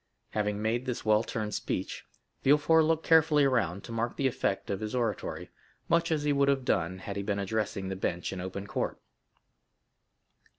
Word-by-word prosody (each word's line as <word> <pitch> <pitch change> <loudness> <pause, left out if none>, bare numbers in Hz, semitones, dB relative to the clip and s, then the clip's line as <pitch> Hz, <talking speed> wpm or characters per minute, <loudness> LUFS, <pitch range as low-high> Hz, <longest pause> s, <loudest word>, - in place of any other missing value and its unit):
Having 105 -1 -1
made 120 +4 0
this 125 - -3
well 110 0 +4
turned 110 -2 -4
speech, - - -3 0.4
Villefort 150 +3 +5
looked 160 0 +1
carefully 160 -2 +5
around 100 -9 +1
to - - -9
mark 115 +1 -2
the 140 - 0
effect 110 -7 0
of 100 - -2
his 110 +3 -4
oratory, 115 -5 -2 0.4
much 170 0 +2
as 155 -2 +1
he 145 -1 +2
would 140 0 +3
have 135 -2 +2
done 95 -6 0
had 100 +1 -6
he - - -1
been 100 0 -1
addressing 100 -1 -2
the 95 - -3
bench 90 -2 -2
in 95 - -5
open 95 +2 -5
court. - - -3
110 Hz, 180 wpm, -29 LUFS, 100-140 Hz, 0.4 s, Villefort